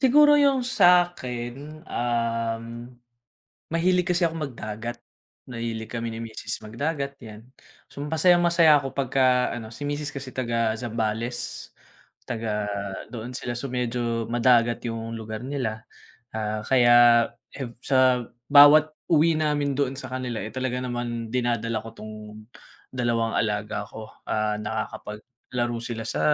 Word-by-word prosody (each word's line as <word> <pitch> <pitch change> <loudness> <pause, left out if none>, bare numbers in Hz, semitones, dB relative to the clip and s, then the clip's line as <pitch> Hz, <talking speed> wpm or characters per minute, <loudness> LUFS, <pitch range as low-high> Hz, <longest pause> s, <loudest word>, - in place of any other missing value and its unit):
siguro 295 +3 +6
yung 275 -3 +3
sakin, 155 - +1
um, 115 -2 -1 1.0
mahilig 180 +2 +1
kasi 180 -1 +1
akong 165 -1 +1
magdagat. 115 -2 -6 0.5
Mahilig 115 -2 -5
kami 115 -1 -3
ni 115 - -5
misis 110 -1 -5
magdagat, 140 +5 -3
yan. 110 -3 -11 0.5
So - - -13
masayang 175 +3 +4
masaya 165 -3 +6
ako 135 -1 -5
pagka 130 -2 +2
ano 115 -1 -7
si 145 - -10
misis 145 0 -3
kasi 135 -1 -6
taga-Zambales, 115 -1 -2 0.6
taga 105 -3 -2 0.4
doon 120 +1 -7
sila. 120 -1 -4
So 140 - -4
medyo 120 -2 -2
madagat 120 0 +3
yung 115 0 -4
lugar 110 +1 -6
nila, 125 -5 -3 0.5
ah, 110 -1 -3
kaya 120 -1 +6 0.3
ev 125 -4 -5
sa 130 -2 +3 0.2
bawat 145 +2 +8 0.2
uwi 165 0 +4
namin 150 -2 0
doon 135 -1 -1
sa 130 -1 -7
kanila, 125 -3 -3
eh, 110 - -9
talaga 130 -1 -2
naman 120 -2 -3
dinadala 115 -1 -1
ko 115 - -9
'tong, 110 -1 -10 0.8
dalawang 115 -2 0
alaga 105 -1 -1
ko. 110 +1 -9 0.2
Ah, 110 0 +1
nakakapaglaro 115 +2 -5
sila 115 -2 -5
sa - - -2
120 Hz, 130 wpm, -25 LUFS, 115-140 Hz, 1.0 s, bawat